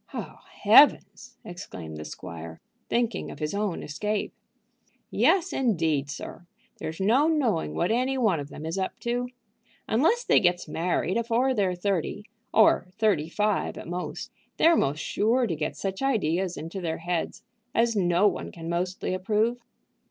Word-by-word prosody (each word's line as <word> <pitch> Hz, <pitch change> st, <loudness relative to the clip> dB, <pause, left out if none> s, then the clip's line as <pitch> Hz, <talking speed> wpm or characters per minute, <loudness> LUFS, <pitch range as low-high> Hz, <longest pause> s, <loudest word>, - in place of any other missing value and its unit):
"Oh -, -, -6 dB, 0.2 s
heavens!" 240 Hz, +1 st, +5 dB
exclaimed 80 Hz, -, -8 dB
the 75 Hz, -, -7 dB
squire, 80 Hz, 0 st, -8 dB, 0.3 s
thinking 235 Hz, -5 st, 0 dB
of -, -, -9 dB
his 150 Hz, +2 st, -3 dB
own 200 Hz, -3 st, -2 dB
escape. 210 Hz, +8 st, -3 dB, 0.8 s
"Yes, 370 Hz, -3 st, +3 dB
indeed, 160 Hz, -, +1 dB
sir. 170 Hz, +4 st, -8 dB, 0.3 s
There's 160 Hz, +3 st, -5 dB
no 235 Hz, +10 st, +3 dB
knowing 240 Hz, -, 0 dB
what 80 Hz, -, +1 dB
any 255 Hz, +3 st, +1 dB
one 215 Hz, -, +2 dB
of 145 Hz, 0 st, -6 dB
them 155 Hz, -, -8 dB
is 165 Hz, +4 st, -3 dB
up 190 Hz, -, -3 dB
to. 245 Hz, +1 st, -1 dB, 0.6 s
Unless 330 Hz, -, +2 dB
they -, -, +5 dB
gets 175 Hz, -2 st, +1 dB
married 175 Hz, +4 st, -1 dB
afore 235 Hz, +3 st, +1 dB
they're 195 Hz, -5 st, +1 dB
thirty, 200 Hz, +2 st, -2 dB, 0.3 s
or 215 Hz, -4 st, +4 dB
thirty 195 Hz, -9 st, +1 dB
five 210 Hz, +3 st, 0 dB
at -, -, -8 dB
most, 180 Hz, +1 st, -5 dB, 0.3 s
they're 335 Hz, +1 st, +5 dB
most 140 Hz, -, +1 dB
sure 235 Hz, +4 st, +1 dB
to 175 Hz, -7 st, -2 dB
get 155 Hz, 0 st, -3 dB
such 190 Hz, -1 st, -4 dB
ideas 190 Hz, -, 0 dB
into 165 Hz, +5 st, -6 dB
their 165 Hz, -2 st, -2 dB
head 170 Hz, 0 st, -2 dB, 0.4 s
as 230 Hz, 0 st, +2 dB
no 180 Hz, 0 st, +3 dB
one -, -, -3 dB
can 165 Hz, -1 st, -9 dB
mostly 180 Hz, +2 st, -2 dB
approve." 215 Hz, +6 st, 0 dB
195 Hz, 155 wpm, -26 LUFS, 165-235 Hz, 0.8 s, heavens